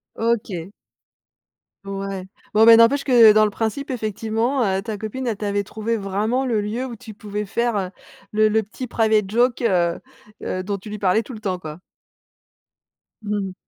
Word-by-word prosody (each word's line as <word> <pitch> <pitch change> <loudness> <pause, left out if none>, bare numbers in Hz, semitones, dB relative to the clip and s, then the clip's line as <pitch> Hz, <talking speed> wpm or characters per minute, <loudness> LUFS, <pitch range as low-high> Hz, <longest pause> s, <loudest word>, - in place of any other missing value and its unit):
OK. 210 -6 -2 1.1
Ouais. 195 -1 -5 0.3
Bon, 220 +1 +6
bah, 230 0 +10
n'empêche 230 +5 +5
que, 235 -5 +7
dans 215 0 +5
le 210 - -1
principe, 225 +7 -3
effectivement, 225 +3 -1
heu, 190 -1 0
ta 220 -1 -5
copine, 220 +5 -5
elle 225 -3 -1
t'avait 205 -1 -1
trouvé 220 +3 -3
vraiment 215 +6 -1
le 230 -4 +1
lieu 220 +5 -3
où 240 -3 -7
tu 220 -1 -11
pouvais 210 0 -5
faire, 205 -3 -1 0.4
le 215 0 +3
le 220 +1 +2
petit 250 +5 -7
private 220 -4 +1
joke, 240 +4 +2
heu 175 -7 +1 0.4
heu, 185 0 -3
dont 200 +1 -3
tu 200 +3 -11
lui 210 - -5
parlais 195 +3 +2
tout 255 - -10
le 220 - -8
temps, 190 -4 -3
quoi? 155 -1 -8 1.4
Mmh. 205 -2 -3
215 Hz, 170 wpm, -22 LUFS, 195-230 Hz, 1.4 s, bah